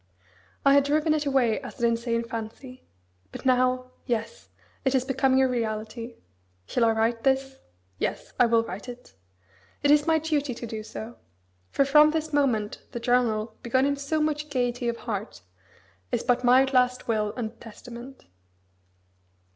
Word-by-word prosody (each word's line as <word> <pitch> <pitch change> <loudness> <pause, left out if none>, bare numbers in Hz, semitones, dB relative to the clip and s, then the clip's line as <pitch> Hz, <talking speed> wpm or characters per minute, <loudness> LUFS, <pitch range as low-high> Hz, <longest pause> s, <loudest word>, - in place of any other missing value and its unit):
I 275 - +7
had 280 0 +5
driven 305 +2 +2
it 300 -1 -1
away 255 -5 +2
as 260 0 -10
an 235 0 +3
insane 230 0 -1
fancy. 230 +3 -8 0.4
But - - -9
now, 255 0 +2 0.2
yes! 235 - -3 0.3
it 265 0 +1
is 255 -1 +1
becoming 265 0 +3
a - - +4
reality. 230 0 -3 0.5
Shall 235 - +1
I 225 - +4
write 225 +1 0
this? 270 0 +1 0.4
Yes! - - -3
I 245 - +6
will 230 0 +3
write 200 +3 -7
it. 245 - -11 0.7
It 285 - +5
is 295 +1 +4
my 320 -1 +4
duty 295 -5 -1
to 240 - -6
do 220 -1 -5
so; 220 +2 -8 0.5
for 275 - +2
from 300 +2 +6
this 315 0 -2
moment 240 -8 +1
the 235 - -3
journal, 230 -3 +1
begun 260 +3 +2
in 285 0 +1
so 280 +3 -2
much 300 0 -1
gaiety 245 -3 -1
of 235 - -3
heart, 205 - -5 0.7
is - - 0
but 245 0 +1
my 250 +2 +6
last 250 -1 +1
will 215 -2 0
and 230 -2 -5
testament. 240 +3 -11
250 Hz, 165 wpm, -26 LUFS, 230-275 Hz, 0.7 s, I